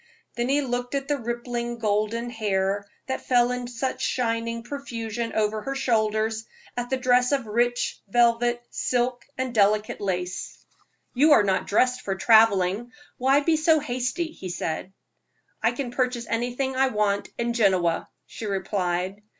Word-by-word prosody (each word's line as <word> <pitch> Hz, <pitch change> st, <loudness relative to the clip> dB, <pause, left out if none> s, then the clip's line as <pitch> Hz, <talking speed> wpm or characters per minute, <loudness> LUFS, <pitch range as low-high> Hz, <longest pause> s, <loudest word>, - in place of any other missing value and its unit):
Then 240 Hz, +1 st, -1 dB
he 285 Hz, +2 st, +3 dB
looked 245 Hz, 0 st, -2 dB
at 275 Hz, 0 st, -2 dB
the 290 Hz, -1 st, 0 dB
rippling, 240 Hz, 0 st, -3 dB
golden 220 Hz, +2 st, -1 dB
hair, 200 Hz, -3 st, -1 dB, 0.2 s
that 265 Hz, -, -4 dB
fell 245 Hz, -1 st, +4 dB
in 250 Hz, -1 st, -3 dB
such 255 Hz, +2 st, -3 dB
shining 230 Hz, -2 st, -1 dB
profusion 235 Hz, -4 st, -4 dB
over 215 Hz, 0 st, 0 dB
her 270 Hz, +5 st, -4 dB
shoulders, 220 Hz, -3 st, +1 dB, 0.3 s
at 245 Hz, 0 st, -3 dB
the 265 Hz, -, +1 dB
dress 250 Hz, 0 st, +3 dB
of 275 Hz, -4 st, +1 dB
rich 240 Hz, +3 st, 0 dB
velvet, 240 Hz, +2 st, +2 dB
silk 245 Hz, 0 st, 0 dB
and 260 Hz, -1 st, -2 dB
delicate 210 Hz, 0 st, +2 dB
lace. 185 Hz, -2 st, -3 dB, 0.5 s
"You 295 Hz, +4 st, +5 dB
are 220 Hz, -, +6 dB
not 190 Hz, -2 st, 0 dB
dressed 250 Hz, +4 st, +2 dB
for 195 Hz, -, -2 dB
traveling. 220 Hz, +1 st, +4 dB, 0.3 s
Why 270 Hz, +3 st, +4 dB
be 315 Hz, +2 st, +2 dB
so 315 Hz, 0 st, +4 dB
hasty?" 275 Hz, +5 st, -2 dB
he 185 Hz, -, -8 dB
said. 175 Hz, +1 st, -3 dB, 0.7 s
"I -, -, +3 dB
can 265 Hz, -4 st, -4 dB
purchase 250 Hz, -1 st, -1 dB
anything 245 Hz, +3 st, -1 dB
I 265 Hz, +1 st, +3 dB
want 210 Hz, -4 st, 0 dB
at 235 Hz, 0 st, 0 dB
Genoa," 185 Hz, -7 st, +2 dB, 0.2 s
she 220 Hz, -, -7 dB
replied. 190 Hz, -1 st, -2 dB
235 Hz, 150 wpm, -25 LUFS, 210-250 Hz, 0.7 s, are